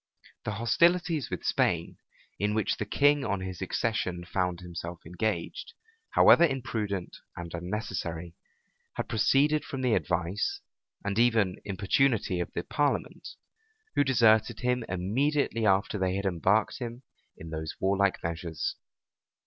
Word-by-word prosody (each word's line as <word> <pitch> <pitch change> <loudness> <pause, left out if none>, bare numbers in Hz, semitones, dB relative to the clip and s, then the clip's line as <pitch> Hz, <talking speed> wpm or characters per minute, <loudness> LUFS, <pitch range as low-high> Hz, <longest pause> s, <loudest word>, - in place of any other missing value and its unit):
The 110 - -2
hostilities 165 +7 +2
with - - -4
Spain, - - 0 0.4
in 105 +1 0
which 110 -3 0
the - - -3
king 145 0 +3
on 100 -5 -1
his 95 0 -6
accession 95 -3 -1
found 90 -1 -1
himself 85 -1 -7
engaged, 95 - -3 0.4
however - - +7
imprudent 110 - -1 0.2
and 85 -1 -7
unnecessary, 90 -2 -4 0.6
had - - -3
proceeded 140 +7 +3
from 135 -4 -5
the 125 -3 +3
advice, 90 0 -1 0.5
and 100 +2 0
even 115 -6 +2
importunity 100 0 +1
of 85 - -3
the 85 - -2
parliament; 145 -1 -1 0.7
who - - +3
deserted 115 -4 +3
him 125 -1 +1
immediately 115 +6 0
after 95 +1 +2
they 95 0 0
had 100 +1 -2
embarked 95 - +1
him 120 +1 -6 0.3
in 80 0 -9
those 80 0 -4
warlike 100 0 +1
measures. 85 - -3
105 Hz, 130 wpm, -29 LUFS, 90-125 Hz, 0.7 s, however